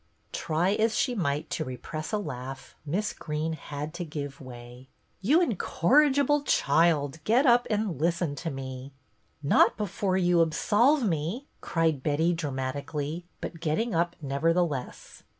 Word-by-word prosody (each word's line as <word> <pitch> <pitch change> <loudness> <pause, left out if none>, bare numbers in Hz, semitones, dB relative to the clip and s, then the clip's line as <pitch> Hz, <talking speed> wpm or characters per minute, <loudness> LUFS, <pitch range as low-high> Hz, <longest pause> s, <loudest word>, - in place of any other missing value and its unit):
Try 165 +4 0
as 220 +1 +1
she 255 - +1
might 150 -9 -2
to 155 - -1
repress 155 +3 -6
a 215 - +1
laugh. 135 -7 -7
Miss 200 +8 -1
Greene 155 +1 -3
had 150 0 -6
to 175 0 -4
give 145 -4 -6
way. 125 0 -11 0.2
" - - -42
You 295 - +4
incorrigible 285 - +3
child, 155 - +2
get 240 - +3
up 245 -1 +5
and 210 - -1
listen 170 -2 +1
to 165 - -3
me." 130 0 -7 0.2
" - - -36
Not 140 - +4
before 195 -2 -1
you 175 -2 +3
absolve 225 - +3
me," 170 - -2 0.2
cried 160 -5 0
Betty, 160 +4 +1
dramatically, 145 +2 -4
but 165 - -6
getting 175 +8 -1
up 170 +1 +1
nevertheless. 150 0 -1
165 Hz, 145 wpm, -28 LUFS, 145-205 Hz, 0.2 s, up